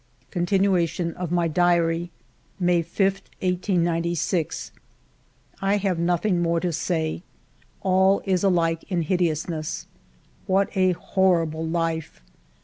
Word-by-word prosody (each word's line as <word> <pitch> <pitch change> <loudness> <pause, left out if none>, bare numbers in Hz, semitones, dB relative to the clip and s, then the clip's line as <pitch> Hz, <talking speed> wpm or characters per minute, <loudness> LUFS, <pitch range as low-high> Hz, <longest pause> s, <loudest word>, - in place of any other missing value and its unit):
Continuation 175 -2 +1
of 180 -2 -5
my 175 -1 +2
Diary 170 0 +2 0.5
May 175 -1 +3
5, 170 +5 -5 0.4
1896. 175 -2 0 0.9
I 195 +1 +2
have 190 -4 -1
nothing 175 +2 +1
more 170 0 +1
to 175 0 -2
say. 160 0 -1 0.6
All 190 +1 +3
is 185 -2 +1
alike 165 -4 +2
in 175 -3 0
hideousness! 160 -2 -1 0.6
What 195 +1 +1
a 185 -1 +3
horrible 170 -3 +1
life 165 - -2
175 Hz, 105 wpm, -24 LUFS, 165-185 Hz, 0.9 s, May